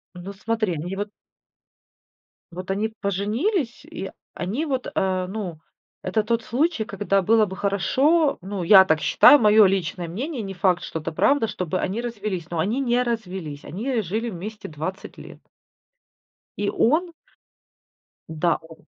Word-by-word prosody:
Ну 185 +3 -8
смотри, 215 -2 -1
они 175 +5 -4
вот 205 +1 -3 1.4
вот 185 +2 -5
они 220 +3 -1
поженились, 230 - -1
и 190 - -7 0.2
они 220 - -3
вот, 265 -3 -2
э, 185 -1 0
ну, 185 -6 -5 0.4
это 210 +4 0
тот 230 +1 0
случай, 265 -2 0
когда 200 -1 0
было 220 +3 +4
бы 190 -1 -7
хорошо 275 - +2
ну, 190 -1 -4
я 190 +1 +8
так 160 -3 +1
считаю, 290 - +7
мое 210 -1 +6
личное 180 -2 -1
мнение, 250 - -4
не 195 -1 -5
факт, 180 -2 +1
что 160 - -4
это 165 +2 -5
правда, 255 - +2
чтобы 180 -1 -3
они 210 +6 -2
развелись. 205 -8 -4
Но 170 -2 -3
они 215 +10 0
не 245 -2 +2
развелись, 190 -11 -4
они 230 - -2
жили 220 +6 -3
вместе 210 +3 -7
20 160 +6 -6
лет. - - -11 1.2
И 205 0 0
он 335 +8 +2 1.2
Да, 160 +2 0
о 160 0 -14
200 Hz, 150 wpm, -23 LUFS, 180-230 Hz, 1.4 s, я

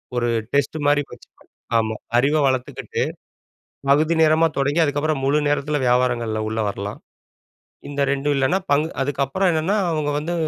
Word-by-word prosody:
ஒரு 120 -1 0 0.3
டெஸ்ட்டு 145 +2 0
மாரி 145 0 +4
வச்சு - - -13
பன் - - -25 0.3
ஆமா. 110 -1 0 0.2
அறிவ 140 +5 +3
வளத்துக்கிட்டு 130 -1 -2 0.9
பகுதி 155 +4 +3
நேரமா 160 +1 +4
தொடங்கி, 140 +4 +1
அதுக்கப்புற 145 +1 0
முழு 145 +3 +2
நேரத்தில 145 +1 0
வியாபாரங்கள்ல 120 -3 +1
உள்ள 110 +1 -2
வரலாம். 100 +1 -5 0.9
இந்த 145 0 -3
2டும் 140 +1 0
இல்லனா 135 +7 +2
பங்கு 150 +3 +2
அதுக்கப்புற 140 +5 -1
என்னனா 165 +5 0 0.2
அவங்க 155 -2 -1
வந்து 155 +4 -3
145 Hz, 145 wpm, -21 LUFS, 125-155 Hz, 0.9 s, மாரி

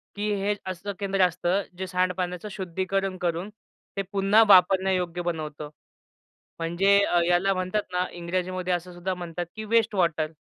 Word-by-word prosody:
की 210 +1 -1
हे 205 +1 +1
असं 190 +2 -4
केंद्र 195 -1 0
असतं 180 +2 0 0.2
जे 190 - -4
सांडपाण्याचं 180 +1 -1
शुद्धीकरण 190 +1 -2
करून 175 +3 -1 0.5
ते - - +2
पुन्हा 200 +3 +5
वापरण्यायोग्य 185 -2 +4
बनवतं. 155 -3 -4 0.9
म्हणजे 175 +5 +3
अ, 175 - +2
याला 180 +3 +3
म्हणतात 185 +3 -1
ना 180 0 +1
इंग्रजीमध्ये 180 +1 -2
असं 175 +1 -4
सुद्धा 175 +2 -3
म्हणतात 175 -1 -5
की 220 - -5
वेस्ट 225 0 +2
वॉटर. 160 -4 +1
185 Hz, 145 wpm, -26 LUFS, 175-195 Hz, 0.9 s, पुन्हा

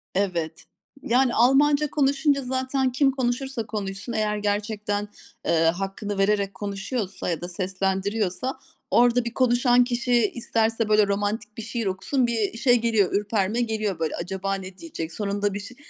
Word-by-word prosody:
Evet. 170 -5 -1 0.4
Yani, 250 +1 +2
Almanca 285 +5 +4
konuşunca 280 0 +2
zaten 260 +1 0
kim 270 +2 +3
konuşursa 260 -1 -2
konuşsun, 205 +1 -5
eğer 210 -1 0
gerçekten, 205 0 -1 0.4
eee, - - +1
hakkını 195 +4 -1
vererek 200 0 +1
konuşuyorsa 200 +1 -4
ya 170 - -2
da 175 - -4
seslendiriyorsa 195 +5 -2 0.3
orada 245 0 +4
bir 235 - -4
konuşan 245 0 +4
kişi 240 -2 +1
isterse, 225 -1 0
böyle, 210 -1 +5
romantik 205 +1 -2
bir - - -4
şiir 230 +1 -3
okusun, 195 +7 0
bir 225 -2 -1
şey 245 +1 +4
geliyor, 225 -5 +2
ürperme 205 +2 0
geliyor 215 -5 -1
böyle 160 - -1
acaba 190 +2 -3
ne 190 -1 -8
diyecek, 165 - -6
sonunda 205 0 -1
bir 200 - -3
ş 205 +5 -10
215 Hz, 145 wpm, -25 LUFS, 195-245 Hz, 0.4 s, böyle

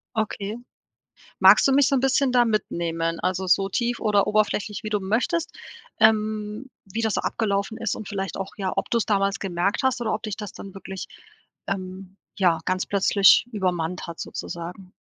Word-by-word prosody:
Okay, 215 0 -2 0.8
magst - - +7
du 270 - +3
mich 280 -1 +5
so 275 - +2
'n - - +3
bisschen 270 0 +2
da 245 -1 +4
mitnehmen, 170 -6 -1
also 185 +1 -1
so 195 +1 +3
tief 240 +4 -1
oder 210 -3 +2
oberflächlich, 210 0 0
wie 215 - -4
du 210 -2 0
möchtest, 250 - 0 0.5
ähm, 215 +2 +1 0.2
wie 220 +4 -4
das 220 -2 0
so - - 0
abgelaufen 200 0 -1
ist 230 -2 -1
und 215 - -8
vielleicht 195 -2 -4
auch, 195 0 -5
ja, 190 -2 -2
ob - - -2
du 235 - +2
es - - -1
damals 200 -2 +1
gemerkt 195 +6 -1
hast 260 -1 +1
oder 230 -2 -1
ob 215 - -3
dich 215 -2 -4
das 210 -2 -7
dann 195 - -10
wirklich, 195 -1 -7 0.6
ähm, 190 -1 -5 0.2
ja, 175 -4 +3
ganz 185 0 -1
plötzlich 200 +1 +5
übermannt 180 -4 -2
hat 170 -1 -8
sozusagen? 180 +2 -7
205 Hz, 185 wpm, -24 LUFS, 190-220 Hz, 0.8 s, magst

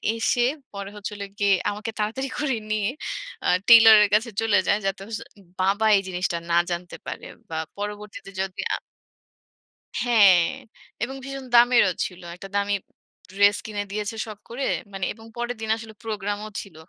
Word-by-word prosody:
এসে, 240 +1 +2 0.3
পরে 200 0 -6
হচ্ছিল 205 0 -6 0.2
গিয়ে 200 -1 +4 0.2
আমাকে 210 +2 -4
তাড়াতাড়ি 245 +6 -1
করে 280 -4 0 0.2
নিয়ে 215 0 +1 0.6
আ - - +2 0.2
টেইলর 225 -2 +10
এর 205 - +2
কাছে 225 +3 +3
চলে 210 -3 +3
যায়, 205 - +3
যাতে 195 0 -1
হচ্ছে 225 -2 -5 0.4
বাবা 200 +3 +2
এই - - +1
জিনিসটা 180 -1 -1
না 170 - +4
জানতে 175 0 -4
পারে। - - -6 0.2
বা 160 - -4 0.2
পরবর্তীতে 205 -1 -6
যদি 190 -1 -3
আ - - +2 1.3
হ্যাঁ। 200 -7 +6 0.6
এবং 265 +3 -3
ভীষণ 275 -1 -6
দামেরও 235 -5 +6
ছিল। 180 -1 -8
একটা 195 +2 -9
দামি 200 0 +1 0.6
ড্রেস 200 +1 +4
কিনে 205 -2 -3
দিয়েছে, 210 +2 -3
শখ 215 -2 -9
করে। 255 +4 -3 0.3
মানে, 190 -1 -2
এবং 225 0 -15
পরের 240 +1 -2
দিন 220 - -4
আসলে 225 -1 -10
প্রোগ্রামও 210 -1 -3
ছিল। 195 -6 -13
210 Hz, 160 wpm, -24 LUFS, 195-225 Hz, 1.3 s, টেইলর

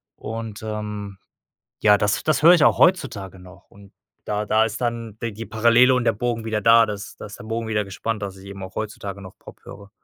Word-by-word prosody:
Und, 110 -1 -7
ähm, 105 -2 -5 0.6
ja, 105 -1 +5
das 105 +1 0
das 155 -1 +1
höre 170 - +9
ich 170 - +3
auch - - +4
heutzutage 115 - +1
noch 95 +2 -15
und 100 -1 -17 0.3
da 105 0 -1
da 110 +1 +3
ist 115 0 -4
dann 115 -3 -3
de 115 - -2
die 110 +2 -8
Parallele 115 +4 +4
und 125 - +1
der - - +3
Bogen 115 +1 -3
wieder 110 -1 -1
da. 115 +1 +6
Das 105 -1 -7
da - - -9
ist 105 - -11
der - - -10
Bogen 115 +1 -4
wieder 105 -1 0
gespannt, 105 +2 -4
dass 95 -1 -5
ich 95 0 -14
eben 100 -1 -9
auch 95 - -11
heutzutage 100 -2 -5
noch 95 - -13
Pop - - -14
höre. 100 0 -12
105 Hz, 225 wpm, -22 LUFS, 100-115 Hz, 0.6 s, höre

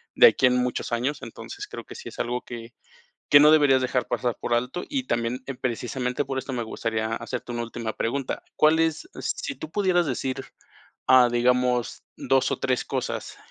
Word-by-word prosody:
de - - +9
aquí - - +3
en 125 0 +2
muchos 125 -1 -1
años. 125 +5 -1
Entonces, 400 +1 -8
creo - - -8
que - - -11
sí 475 - -8
es - - -13
algo 125 +1 -1
que 115 0 -9 0.6
que 145 - +9
no 150 +1 +8
deberías 145 -4 +5
dejar 125 -1 0
pasar 120 0 -1
por - - -3
alto. 125 +9 -1
Y 275 -3 -2
también, 115 - -1
en 135 - -5
precisamente 125 +2 -2
por 135 0 -3
esto, 130 +1 -5
me 120 -1 -2
gustaría 110 0 -2
hacerte 120 +1 -5
una 120 0 -2
última 115 -1 -5
pregunta, 130 +3 -2
¿cuál 155 +1 +5
es, 165 - 0
si 285 - -3
tú 155 - -8
pudieras 180 -2 +2
decir, 130 0 -3 0.6
ah, 130 -1 +7
digamos, 125 0 +1
2 135 -1 +1
o - - -2
3 130 -1 0
cosas - - -4
125 Hz, 190 wpm, -25 LUFS, 120-145 Hz, 0.6 s, de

